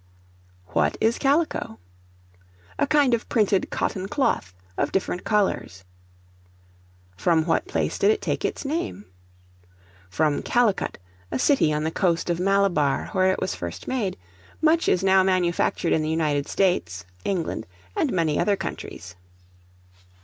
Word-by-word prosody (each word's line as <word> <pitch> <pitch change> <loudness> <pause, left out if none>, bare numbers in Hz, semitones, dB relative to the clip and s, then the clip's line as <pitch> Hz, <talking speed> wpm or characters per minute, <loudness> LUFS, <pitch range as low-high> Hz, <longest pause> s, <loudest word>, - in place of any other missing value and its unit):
What 75 -3 +1
is 225 +1 +1
Calico? 285 - 0 1.0
A - - +2
kind 290 -4 +3
of 235 - -1
printed 205 -4 +2
cotton 190 0 -2
cloth, 200 - 0 0.2
of - - -1
different 185 -1 -1
colors. 195 - 0 1.3
From 160 - +2
what 170 - 0
place 390 - -2
did - - +4
it 430 0 +3
take - - -2
its - - -3
name? 310 - -3 1.0
From 145 - +1
Calicut, 240 -5 +1 0.3
a 130 - -2
city 160 - +3
on 150 0 -1
the 160 - -1
coast 175 -1 0
of 170 - -1
Malabar, 185 -7 +2
where 190 0 +3
it - - -2
was 185 - -2
first 85 0 -7
made; 230 -8 -2 0.4
much 325 +1 +3
is 185 - +2
now 190 0 +5
manufactured 180 -2 +1
in 160 - +2
the 155 - -2
United 150 -3 0
States, 90 - 0 0.2
England, 175 - -2 0.3
and - - +1
many 165 -4 +1
other 205 - +2
countries. 90 - -7
185 Hz, 140 wpm, -24 LUFS, 155-210 Hz, 1.3 s, now